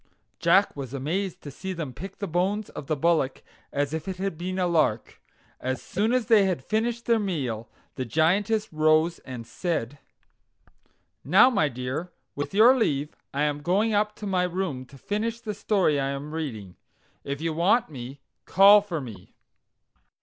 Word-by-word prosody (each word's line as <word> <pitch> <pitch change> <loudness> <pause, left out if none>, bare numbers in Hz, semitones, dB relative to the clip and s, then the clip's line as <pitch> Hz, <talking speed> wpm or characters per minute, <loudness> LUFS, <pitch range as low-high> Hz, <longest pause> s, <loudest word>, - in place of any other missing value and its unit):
Jack 200 +1 +3
was 135 -2 -6
amazed 175 +8 -3
to 145 - -7
see 190 +7 -5
them 160 -7 -5
pick 190 +10 -9
the 200 - -3
bones 190 +5 -1
of 140 - -8
the 155 - 0
bullock 155 -3 +1 0.3
as 145 +1 -1
if 160 +1 -4
it 190 -1 -4
had 195 -2 -2
been 185 +3 -4
a 185 - +1
lark. 155 -10 0 0.4
As 130 0 -2
soon 210 +5 -1
as 250 -2 +1
they 215 -3 +5
had 180 -8 -1
finished 235 +2 -1
their 230 -1 +3
meal, 130 - -3 0.2
the 130 - -3
Giantess 190 - +1
rose 155 +2 +3
and 125 -3 -8
said: 145 0 -3 1.2
"Now, 195 - +6
my 155 - +2
dear, 130 +7 -4 0.2
with 145 - -4
your 225 +6 +6
leave 150 - 0 0.2
I 140 +2 -1
am 150 -1 -1
going 205 +8 +1
up 210 +1 +1
to 210 - -8
my 190 -2 +1
room 175 -8 -3
to 135 +2 -15
finish 220 - -3
the 220 -3 -5
story 190 -8 +1
I 135 0 -1
am 140 +2 -5
reading. 110 - -5 0.5
If 140 0 -4
you 165 0 -2
want 175 +5 +2
me, 135 +1 -8 0.3
call 200 +2 +7
for 175 -7 -4
me." 105 -8 -11
165 Hz, 175 wpm, -26 LUFS, 140-200 Hz, 1.2 s, call